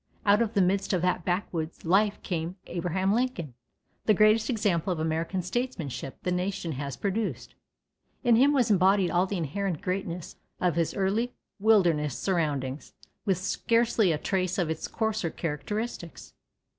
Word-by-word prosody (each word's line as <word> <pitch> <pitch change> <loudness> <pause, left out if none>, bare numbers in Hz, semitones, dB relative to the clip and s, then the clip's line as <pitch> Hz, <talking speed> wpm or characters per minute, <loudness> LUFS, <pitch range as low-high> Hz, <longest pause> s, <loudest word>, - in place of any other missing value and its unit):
Out 205 +2 +5
of 230 -1 -1
the 195 - +5
midst 195 +2 +1
of 180 -2 +1
that 180 -1 +1
backwoods 175 -3 -2
life 200 +4 +3
came 170 0 -3
Abraham 180 +3 0
Lincoln, 225 - -1 0.5
the 215 - +5
greatest 215 +2 +4
example 205 -7 +1
of 175 - -2
American 165 +3 -1
statesmanship 180 - -3
the 180 - 0
nation 180 -1 -2
has 140 0 -4
produced. 205 +2 -2 0.7
In 240 -2 +5
him 270 +5 +5
was 250 -6 +2
embodied 190 -1 +4
all 180 +2 +2
the 200 - -2
inherent 170 +2 -2
greatness 180 -2 -4 0.2
of 180 -2 +2
his 165 -2 0
early 210 +5 0 0.2
wilderness 170 - +3
surroundings, 145 -7 -2 0.3
with 190 -3 +3
scarcely 225 +1 +2
a 155 - +1
trace 185 +2 -1
of 170 -4 0
its 160 - -4
coarser 220 -5 -1
characteristics. 170 +4 -5
185 Hz, 150 wpm, -28 LUFS, 165-210 Hz, 0.7 s, Out